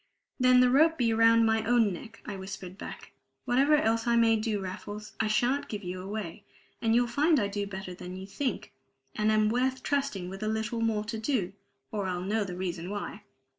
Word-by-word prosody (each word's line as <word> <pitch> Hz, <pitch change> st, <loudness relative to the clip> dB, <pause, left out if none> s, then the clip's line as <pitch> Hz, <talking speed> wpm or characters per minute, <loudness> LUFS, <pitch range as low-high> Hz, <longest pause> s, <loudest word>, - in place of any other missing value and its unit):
"Then 255 Hz, 0 st, +6 dB
the 250 Hz, 0 st, +4 dB
rope 320 Hz, +5 st, +5 dB
be 230 Hz, -3 st, +2 dB
round 230 Hz, 0 st, +5 dB
my 220 Hz, 0 st, +2 dB
own 230 Hz, -4 st, +3 dB
neck!" 225 Hz, +6 st, -10 dB
I 205 Hz, -, -5 dB
whispered 190 Hz, -1 st, -7 dB
back. -, -, -9 dB, 0.3 s
"Whatever 270 Hz, +4 st, +4 dB
else 230 Hz, -5 st, +1 dB
I 235 Hz, -, +3 dB
may 230 Hz, -1 st, +5 dB
do, 215 Hz, -1 st, -1 dB
Raffles, 205 Hz, +3 st, -7 dB
I 220 Hz, -, +2 dB
shan't 245 Hz, +6 st, +1 dB
give 210 Hz, -2 st, -5 dB
you 180 Hz, 0 st, -5 dB
away; 205 Hz, -1 st, -6 dB, 0.4 s
and 225 Hz, -1 st, +2 dB
you'll 245 Hz, +1 st, +4 dB
find 290 Hz, +6 st, +3 dB
I 205 Hz, -, +1 dB
do 200 Hz, 0 st, -3 dB
better 190 Hz, -2 st, -6 dB
than 180 Hz, 0 st, -8 dB
you 190 Hz, +1 st, -7 dB
think, 250 Hz, +7 st, -3 dB, 0.4 s
and 215 Hz, 0 st, +2 dB
am 215 Hz, 0 st, +3 dB
worth 255 Hz, +3 st, 0 dB
trusting 275 Hz, -10 st, -1 dB
with 195 Hz, +2 st, -8 dB
a 215 Hz, -, -1 dB
little 220 Hz, +1 st, -2 dB
more 220 Hz, -2 st, +1 dB
to 215 Hz, +1 st, -5 dB
do, 215 Hz, -6 st, -1 dB, 0.4 s
or 205 Hz, -3 st, -2 dB
I'll 180 Hz, -1 st, -2 dB
know 210 Hz, +3 st, 0 dB
the 180 Hz, -2 st, -6 dB
reason 180 Hz, -1 st, -4 dB
why!" 205 Hz, 0 st, -5 dB
215 Hz, 210 wpm, -29 LUFS, 195-240 Hz, 0.4 s, Then